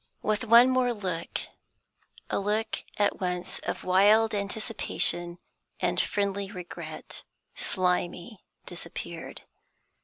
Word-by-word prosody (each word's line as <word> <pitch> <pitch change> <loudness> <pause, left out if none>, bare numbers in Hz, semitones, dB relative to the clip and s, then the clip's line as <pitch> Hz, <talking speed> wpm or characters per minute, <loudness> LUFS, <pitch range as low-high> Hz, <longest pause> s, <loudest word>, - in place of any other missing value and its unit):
With 215 +4 0
one 235 +3 +8
more 255 -1 +2
look, 180 -5 -3 0.9
a - - +1
look 210 +2 -1
at 205 -1 +2
once 180 -1 -2
of - - -4
wild 210 +4 +5
anticipation 200 -4 0 0.4
and - - +2
friendly 200 -1 -1
regret, 180 -4 -7 0.3
Slimy 180 +3 -1 0.2
disappeared. - - -7
200 Hz, 95 wpm, -28 LUFS, 180-220 Hz, 0.9 s, one